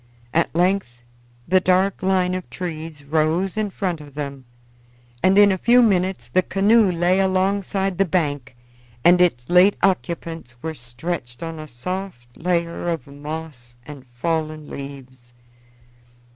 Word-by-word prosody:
At 170 0 +1
length 175 -9 0 0.4
the 185 +2 +4
dark 185 +2 +2
line 185 -1 +1
of 185 -1 -5
trees 160 -4 -6
rose 160 +5 0
in 215 -1 -1
front 180 -4 -3
of 145 -2 -14
them, 140 -3 -6 0.8
and 190 +1 +4
in 205 -1 +7
a 190 - -1
few 240 +4 +5
minutes 190 -3 +1
the 185 - +2
canoe 200 +2 +3
lay 175 +2 +2
alongside 195 0 0
the 195 - +4
bank 145 -9 -1 0.5
and 180 +1 +6
its 120 -9 +2
late 180 +3 +5
occupants 170 -8 -1
were 160 - -3
stretched 125 +1 -6
on 165 -1 -5
a 155 - -8
soft 145 -2 -6
layer 170 0 -1
of 165 -6 -3
moss 145 -4 -8
and 140 -2 -11
fallen 155 +4 -3
leaves. 130 -3 -10
170 Hz, 140 wpm, -22 LUFS, 145-185 Hz, 0.8 s, in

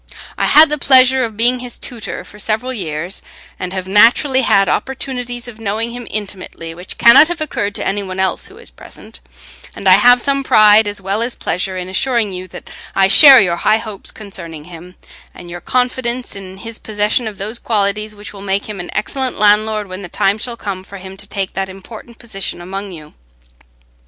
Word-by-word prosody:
I - - -1
had 310 0 +6
the 300 - 0
pleasure 260 -1 +5
of 225 -3 -5
being 245 +2 +2
his 245 -1 -6
tutor 235 -4 -6
for 210 - -15
several 225 +5 0
years, 175 -3 -3 0.4
and 180 -1 -5
have 185 -1 -5
naturally 240 +7 +4
had 195 -5 +3
opportunities 250 -2 -4
of 225 -2 -11
knowing 225 +2 -3
him 245 0 -8
intimately 190 -5 -6
which 180 +3 -5
cannot 235 +6 +7
have 345 0 -5
occurred 205 -9 -3
to - - -2
any 205 +1 -1
one 190 -1 -7
else 190 0 -1
who - - -16
is - - -9
present; - - -14 0.6
and 195 - -4
I 185 0 +7
have 245 +4 +5
some 275 +2 0
pride 215 -3 +5
as 205 -1 -4
well 195 +3 -2
as 240 +1 -1
pleasure 185 +2 -3
in 180 0 -5
assuring 225 +2 0
you 185 0 -7
that - - -12 0.3
I 195 0 +3
share 275 +4 +9
your 175 -3 0
high 215 - +2
hopes 215 -3 -7
concerning 170 -7 -8
him, 175 +2 -13 0.4
and 175 -1 -11
your 175 0 -8
confidence 250 -1 -2
in 190 -1 -10
his 225 +2 -5
possession 215 +2 -1
of 210 -2 -7
those 215 +4 -4
qualities 210 0 -2
which 205 0 -10
will 200 - -11
make 195 0 -2
him 210 -3 -7
an 175 - -7
excellent 260 +4 -3
landlord 210 0 +2
when 185 +1 -8
the 180 - -8
time 200 +5 0
shall 235 +1 -5
come 195 -4 -6
for 200 +1 -11
him 190 0 -10
to 205 - -6
take 195 -2 -4
that 190 0 -3
important 220 +5 -12
position 195 -6 -2
among 195 +3 -7
you. 155 -3 -12
210 Hz, 200 wpm, -16 LUFS, 190-235 Hz, 0.6 s, share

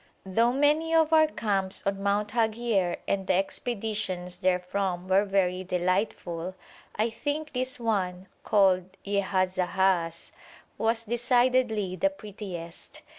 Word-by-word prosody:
Though 230 +5 +2
many 300 +5 +2
of 320 -1 +4
our 315 0 +6
camps 195 -9 -1
on 195 0 -1
Mount 200 +1 +1
Haghier 220 -5 0
and 195 -1 -1
the 185 - +3
expeditions 195 -3 -2
therefrom 180 0 -1
were 190 +2 +4
very 185 -2 +1
delightful, 180 -1 -1 0.4
I 220 +2 0
think 300 +5 -3
this 255 0 -1
one, 190 -5 -1 0.2
called 190 -2 +2
Yehazahaz, 185 -3 0 0.5
was 225 +1 +1
decidedly 240 -4 +1
the 290 - +2
prettiest. 195 - -9
200 Hz, 115 wpm, -27 LUFS, 185-235 Hz, 0.5 s, our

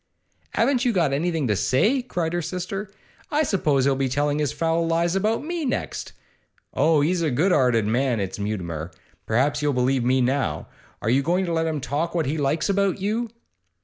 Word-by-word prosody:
'Haven't 265 -2 +2
you 245 - +2
got 170 -8 +2
anything 160 -1 0
to 105 - +1
say?' 215 - +2
cried 175 -9 -3
her 175 - 0
sister. 185 +4 -4 0.4
'I 305 +1 +2
suppose 150 - +1
he'll 140 -1 +3
be 135 0 0
telling 145 +3 0
his 150 -3 0
foul 165 0 0
lies 170 +2 +1
about 215 +6 0
me 340 0 -3
next. 265 - -3 0.6
Oh, 155 -2 +3
he's 170 +4 +1
a 160 - +1
good 155 +9 +2
'earted 125 -8 +3
man, 120 +2 +1
is 95 +1 -4
Mutimer! 85 -6 -3 0.4
Perhaps 130 +7 +1
you'll 145 -1 +1
believe 125 0 +1
me 130 +2 +2
now. 130 - 0 0.4
Are 110 - 0
you 135 +3 +3
going 175 +6 +1
to 170 - -2
let 165 0 +1
him 155 -2 -1
talk 150 +6 -2
what 165 -3 +1
he 150 +3 -2
likes 150 +3 0
about 200 -1 +1
you? 220 +4 -1
155 Hz, 195 wpm, -24 LUFS, 130-185 Hz, 0.6 s, he'll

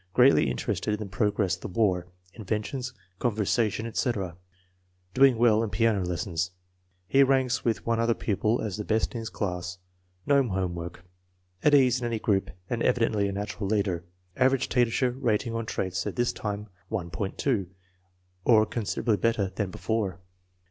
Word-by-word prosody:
Greatly 125 +2 +6
interested 105 -1 -1
in - - -9
the 105 - -4
progress 100 0 0
of 90 - -4
the - - -5
war, 90 -3 +1 0.3
inventions, 110 +4 -3 0.3
conversation, 110 -1 0
etc. 110 -7 -2 0.8
Doing 135 -2 +5
well 115 -2 +4
in 115 - -1
piano 105 0 +2
lessons. 90 0 -2 0.6
He 135 +7 +4
ranks 130 -2 +3
with 115 -2 0
one 115 0 +1
other 115 0 +2
pupil 110 +2 0
as 105 -3 -3
the 105 - -3
best 110 +1 0
in 120 - -3
his 115 -1 -5
class. 90 -4 -3 0.5
No 140 -1 +5
home 95 -7 -1
work. 85 +1 -7 0.6
At 150 - +6
ease 130 -3 +4
in 120 - -1
any 115 -1 -1
group 100 -3 +1 0.2
and 120 -1 -2
evidently 115 -5 +2
a - - -2
natural 100 +1 -4
leader. 100 -4 0 0.3
Average 130 0 +3
teacher 125 0 +2
rating 115 -2 0
on 115 -1 -3
traits 95 -2 -2
at - - -4
this 120 -1 +1
time, 105 0 -4 0.2
1.20, 100 +2 -1 0.8
or 110 -1 +5
considerably 110 0 -1
better 105 -4 +1
than 105 -3 -2
before. 100 -3 -2
110 Hz, 160 wpm, -27 LUFS, 95-120 Hz, 0.8 s, Greatly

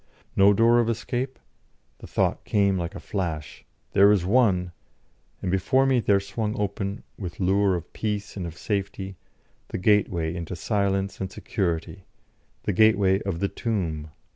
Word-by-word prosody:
No 100 +1 +6
door 115 +3 +5
of 115 -1 +2
escape? 125 +3 -2 0.6
The - - -10
thought - - 0
came 100 -2 +2
like 90 +2 -3
a - - -5
flash: 85 -7 -4 0.3
"There 100 +1 +7
is 100 -4 +2
one!" 95 -5 +3 0.7
And 90 - -1
before 130 +8 +3
me 130 -2 +3
there 100 -3 +3
swung 105 +2 -3
open, 100 0 -3 0.2
with 90 -4 -6
lure 95 +1 +3
of 85 - -7
peace 105 -1 -3
and 90 -4 -4
of 80 - -9
safety, 95 -2 -3 0.5
the - - -4
gateway 90 -5 +2
into 85 +1 -5
silence 100 +2 -1
and 95 -1 -3
security, 90 -1 -3 0.6
the 105 - 0
gateway 100 -1 +4
of 95 -4 -3
the 100 - +2
tomb. 85 -10 -3
100 Hz, 155 wpm, -25 LUFS, 90-105 Hz, 0.7 s, There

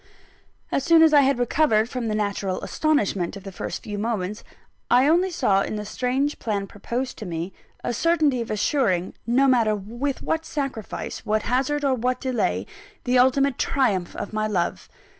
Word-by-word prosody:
As 275 - 0
soon 330 -1 +6
as 320 -1 +5
I 290 - +8
had 275 -1 +2
recovered 240 -3 +2
from 245 -1 -4
the 215 - -1
natural 200 -3 -1
astonishment 200 - 0
of 195 - -11
the 195 - -7
first - - -5
few 205 -1 -5
moments, 210 -2 -2 0.5
I 250 +3 +5
only 350 +4 +3
saw 245 - +2
in 215 - -3
the 210 0 -4
strange 260 +6 -1
plan 205 -3 -2
proposed 235 +6 -5
to 215 - -6
me, 170 +2 -4 0.3
a - - -1
certainty 300 -2 +2
of 230 - -5
assuring 205 -5 0
no 260 +4 +4
matter 230 -5 +3
with 240 +7 -4
what 320 0 -1
sacrifice, 255 -7 -5
what 215 -1 0
hazard, 275 +4 0
or 270 - +3
what 250 +1 -1
delay 255 -4 -1 0.4
the 250 0 +3
ultimate 260 +1 +3
triumph 205 -10 0
of - - -6
my 215 0 0
love. 180 -5 -2
240 Hz, 180 wpm, -24 LUFS, 210-275 Hz, 0.5 s, I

